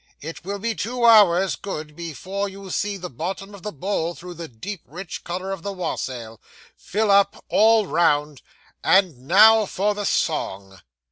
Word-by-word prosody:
'It 165 Hz, +3 st, -8 dB
will 200 Hz, +3 st, -4 dB
be 230 Hz, +3 st, -2 dB
two 235 Hz, +3 st, -2 dB
hours, 195 Hz, -5 st, +6 dB
good, 155 Hz, -6 st, -7 dB
before 185 Hz, +5 st, -4 dB
you 195 Hz, -1 st, -10 dB
see 205 Hz, +2 st, -1 dB
the 180 Hz, -1 st, -6 dB
bottom 190 Hz, -, -6 dB
of 200 Hz, -, -11 dB
the 210 Hz, -, -5 dB
bowl 170 Hz, +1 st, -2 dB
through 180 Hz, +1 st, -9 dB
the 170 Hz, -1 st, -8 dB
deep 165 Hz, -, -7 dB
rich 175 Hz, +5 st, -8 dB
colour 185 Hz, +2 st, -4 dB
of 195 Hz, -3 st, -5 dB
the 200 Hz, -, -4 dB
wassail; 125 Hz, -, -5 dB, 0.3 s
fill 210 Hz, 0 st, -1 dB
up 200 Hz, 0 st, +3 dB
all 220 Hz, 0 st, +4 dB
round, 150 Hz, -5 st, +1 dB, 0.4 s
and 170 Hz, -10 st, +2 dB
now 215 Hz, +5 st, +7 dB
for 205 Hz, +3 st, 0 dB
the 205 Hz, 0 st, -4 dB
song. 95 Hz, -, -2 dB
185 Hz, 165 wpm, -23 LUFS, 160-200 Hz, 0.4 s, now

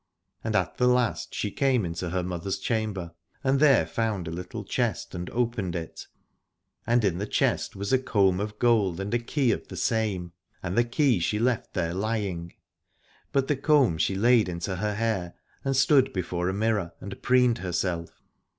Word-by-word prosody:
And 110 Hz, -1 st, -2 dB
at 90 Hz, -3 st, 0 dB
the 125 Hz, -, +3 dB
last 125 Hz, -2 st, +1 dB
she 105 Hz, -, -2 dB
came 130 Hz, -6 st, +2 dB
into 85 Hz, +1 st, -4 dB
her 90 Hz, +1 st, -1 dB
mother's 90 Hz, +1 st, -3 dB
chamber 105 Hz, -7 st, -2 dB, 0.3 s
and 135 Hz, 0 st, +2 dB
there 140 Hz, -, +5 dB
found 100 Hz, 0 st, -2 dB
a -, -, -4 dB
little 90 Hz, +2 st, -6 dB
chest, -, -, -2 dB
and 90 Hz, 0 st, -5 dB
opened 115 Hz, -7 st, -1 dB
it, 85 Hz, -2 st, -6 dB, 0.8 s
and 120 Hz, -1 st, +3 dB
in 90 Hz, -3 st, 0 dB
the 105 Hz, -, -3 dB
chest -, -, 0 dB
was 100 Hz, +6 st, -2 dB
a 130 Hz, -, +5 dB
comb 100 Hz, -7 st, +2 dB
of 105 Hz, +1 st, -4 dB
gold 105 Hz, -7 st, +2 dB
and 100 Hz, +2 st, -3 dB
a 120 Hz, -, +3 dB
key 125 Hz, +1 st, +1 dB
of -, -, -3 dB
the 95 Hz, -, -8 dB
same. 100 Hz, -3 st, -1 dB, 0.3 s
And 95 Hz, 0 st, -3 dB
the 120 Hz, -, +5 dB
key 120 Hz, -, +2 dB
she 95 Hz, +5 st, 0 dB
left 120 Hz, +1 st, 0 dB
there 85 Hz, -3 st, -1 dB
lying, 95 Hz, -4 st, -2 dB, 0.8 s
but 135 Hz, -1 st, +1 dB
the 150 Hz, -, +2 dB
comb 135 Hz, -, +3 dB
she 95 Hz, -, +1 dB
laid 115 Hz, 0 st, +4 dB
into 90 Hz, +2 st, -3 dB
her 105 Hz, +2 st, -1 dB
hair, 100 Hz, -6 st, -1 dB, 0.3 s
and 135 Hz, 0 st, 0 dB
stood 135 Hz, -1 st, +4 dB
before 90 Hz, -1 st, -2 dB
a -, -, +1 dB
mirror 105 Hz, -5 st, 0 dB
and 100 Hz, +1 st, -8 dB
preened 125 Hz, -2 st, +3 dB
herself. 90 Hz, -2 st, -3 dB
105 Hz, 185 wpm, -27 LUFS, 90-120 Hz, 0.8 s, there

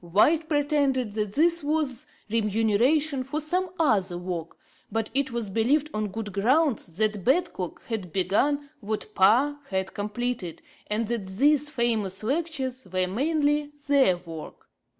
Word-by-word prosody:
White 300 Hz, -, +3 dB
pretended 285 Hz, -6 st, +1 dB
that 210 Hz, -2 st, -3 dB
this 340 Hz, +2 st, +3 dB
was 290 Hz, -4 st, 0 dB, 0.2 s
remuneration 230 Hz, +7 st, +2 dB
for 275 Hz, +4 st, -3 dB
some 360 Hz, +5 st, 0 dB
other 195 Hz, -, +2 dB
work; 175 Hz, -2 st, -5 dB, 0.3 s
but 225 Hz, -1 st, -2 dB
it 270 Hz, 0 st, +1 dB
was 235 Hz, -4 st, -3 dB
believed 275 Hz, +9 st, +2 dB
on 215 Hz, 0 st, -1 dB
good 205 Hz, 0 st, -6 dB
grounds 230 Hz, -, +1 dB
that 210 Hz, -2 st, 0 dB
Badcock 265 Hz, -, 0 dB
had 205 Hz, -7 st, -4 dB
begun 280 Hz, -, +1 dB
what 215 Hz, 0 st, -4 dB
Parr 250 Hz, +10 st, +4 dB
had 190 Hz, -1 st, -2 dB
completed, 210 Hz, -3 st, -3 dB, 0.2 s
and 215 Hz, +1 st, -1 dB
that 225 Hz, -4 st, -2 dB
these 285 Hz, +9 st, +2 dB
famous 225 Hz, -8 st, 0 dB
Lectures 265 Hz, -, -2 dB
were 185 Hz, 0 st, +1 dB
mainly 295 Hz, -, 0 dB
their 270 Hz, -11 st, +4 dB
work. 165 Hz, -3 st, -10 dB
235 Hz, 135 wpm, -26 LUFS, 200-290 Hz, 0.3 s, Parr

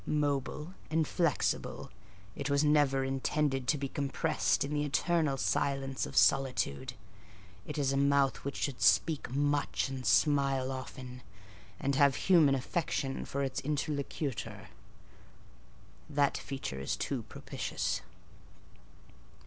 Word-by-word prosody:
Mobile 150 Hz, +2 st, -1 dB, 0.2 s
and 160 Hz, -1 st, +1 dB
flexible, 170 Hz, -6 st, -1 dB, 0.4 s
it -, -, -3 dB
was 140 Hz, +1 st, +3 dB
never 145 Hz, -3 st, +3 dB
intended 135 Hz, 0 st, 0 dB
to 150 Hz, -, +3 dB
be 140 Hz, 0 st, -3 dB
compressed 140 Hz, 0 st, 0 dB
in 140 Hz, +2 st, -4 dB
the 145 Hz, 0 st, 0 dB
eternal 150 Hz, 0 st, +1 dB
silence 135 Hz, 0 st, 0 dB
of -, -, -7 dB
solitude: 130 Hz, -, +2 dB, 0.7 s
it -, -, -5 dB
is 140 Hz, -2 st, +1 dB
a -, -, +1 dB
mouth 140 Hz, -1 st, +3 dB
which 140 Hz, -, -5 dB
should 140 Hz, -4 st, -3 dB
speak 160 Hz, -4 st, +3 dB
much 145 Hz, +1 st, 0 dB
and 130 Hz, -1 st, -5 dB
smile 135 Hz, -2 st, +3 dB
often, 125 Hz, -1 st, -7 dB, 0.6 s
and 140 Hz, -, 0 dB
have 140 Hz, 0 st, +4 dB
human 160 Hz, -7 st, +4 dB
affection 135 Hz, 0 st, -2 dB
for 140 Hz, 0 st, -2 dB
its 135 Hz, -, -2 dB
interlocutor. 145 Hz, -3 st, -3 dB, 1.4 s
That 145 Hz, -1 st, +2 dB
feature 100 Hz, -, -5 dB
too -, -, -2 dB
is -, -, -15 dB
propitious. -, -, -3 dB
140 Hz, 120 wpm, -31 LUFS, 135-150 Hz, 1.4 s, have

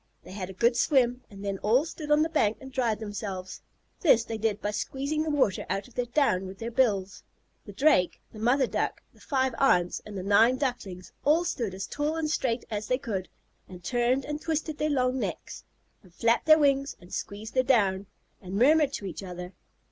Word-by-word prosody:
They -, -, -12 dB
had 190 Hz, -1 st, -5 dB
a -, -, -7 dB
good 235 Hz, +5 st, +2 dB
swim, 250 Hz, -2 st, +2 dB
and 200 Hz, 0 st, -10 dB
then 195 Hz, -1 st, -2 dB
all 245 Hz, +8 st, +3 dB
stood 310 Hz, -2 st, -7 dB
on 300 Hz, +1 st, +5 dB
the -, -, +1 dB
bank 220 Hz, -10 st, +1 dB
and 265 Hz, 0 st, -10 dB
dried 240 Hz, -5 st, 0 dB
themselves. 205 Hz, -3 st, -6 dB, 0.4 s
This 245 Hz, -, +5 dB
they 225 Hz, -1 st, -5 dB
did 215 Hz, -2 st, 0 dB
by 210 Hz, -, -2 dB
squeezing 275 Hz, +8 st, -2 dB
the 315 Hz, -, -1 dB
water 270 Hz, -10 st, +1 dB
out 195 Hz, +4 st, -2 dB
of 250 Hz, -, -19 dB
their 245 Hz, 0 st, -2 dB
down 240 Hz, -8 st, +1 dB
with 190 Hz, +1 st, -9 dB
their 230 Hz, +2 st, -5 dB
bills. 200 Hz, -6 st, +1 dB, 0.5 s
The -, -, -7 dB
Drake, 235 Hz, -, +3 dB
the 215 Hz, -, -10 dB
mother 250 Hz, +5 st, +3 dB
Duck, -, -, -2 dB
the -, -, -23 dB
five 265 Hz, -3 st, 0 dB
aunts, 180 Hz, -10 st, +3 dB
and 210 Hz, -2 st, -8 dB
the 185 Hz, -, -4 dB
nine 225 Hz, +6 st, +4 dB
Ducklings 240 Hz, -10 st, -4 dB
all 320 Hz, +4 st, +3 dB
stood 230 Hz, -, -2 dB
as 195 Hz, +1 st, -4 dB
tall 295 Hz, +8 st, -2 dB
and 315 Hz, -2 st, -1 dB
straight 245 Hz, -5 st, -1 dB
as 210 Hz, 0 st, -3 dB
they 255 Hz, -, +2 dB
could, 195 Hz, -8 st, -4 dB, 0.4 s
and 180 Hz, -2 st, -11 dB
turned 245 Hz, +4 st, +1 dB
and 300 Hz, 0 st, -4 dB
twisted 315 Hz, -1 st, -2 dB
their 305 Hz, +1 st, +1 dB
long 255 Hz, -2 st, +1 dB
necks, -, -, -5 dB, 0.4 s
and 185 Hz, -, -20 dB
flapped 230 Hz, -, +1 dB
their 310 Hz, 0 st, +8 dB
wings, 275 Hz, -2 st, +1 dB
and 175 Hz, -, -15 dB
squeezed 210 Hz, +2 st, -5 dB
their 255 Hz, -, +4 dB
down, 200 Hz, -7 st, +2 dB, 0.3 s
and 190 Hz, -1 st, -7 dB
murmured 285 Hz, +5 st, +4 dB
to 205 Hz, -, -5 dB
each 175 Hz, -3 st, -6 dB
other. 180 Hz, -1 st, -7 dB
235 Hz, 210 wpm, -28 LUFS, 195-275 Hz, 0.5 s, their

